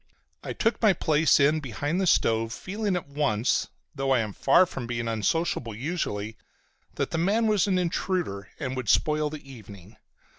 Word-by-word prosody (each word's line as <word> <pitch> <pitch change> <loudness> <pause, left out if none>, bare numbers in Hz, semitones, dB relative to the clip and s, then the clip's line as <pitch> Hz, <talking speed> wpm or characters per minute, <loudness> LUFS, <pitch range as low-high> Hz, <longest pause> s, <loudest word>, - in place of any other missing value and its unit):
I - - -4
took 225 0 0
my 215 -4 +5
place 155 -2 +3
in 150 +3 +4
behind 145 - -2
the 190 - +1
stove, 115 -6 +2
feeling 200 - -3
at 175 -5 -4
once, 140 -5 0 0.3
though 135 -1 -2
I 130 -2 +4
am 105 -2 -4
far 155 - +4
from 130 -8 -6
being 115 -1 -3
unsociable 115 +1 -1
usually, 110 - -3 0.6
that - - -2
the 165 - -1
man 205 +7 +2
was 210 -3 +2
an 190 -2 +2
intruder 175 - -2
and 130 -4 -3
would 125 -5 -4
spoil 150 +5 +2
the 150 -2 -9
evening. 105 -5 -13
145 Hz, 175 wpm, -26 LUFS, 115-175 Hz, 0.6 s, my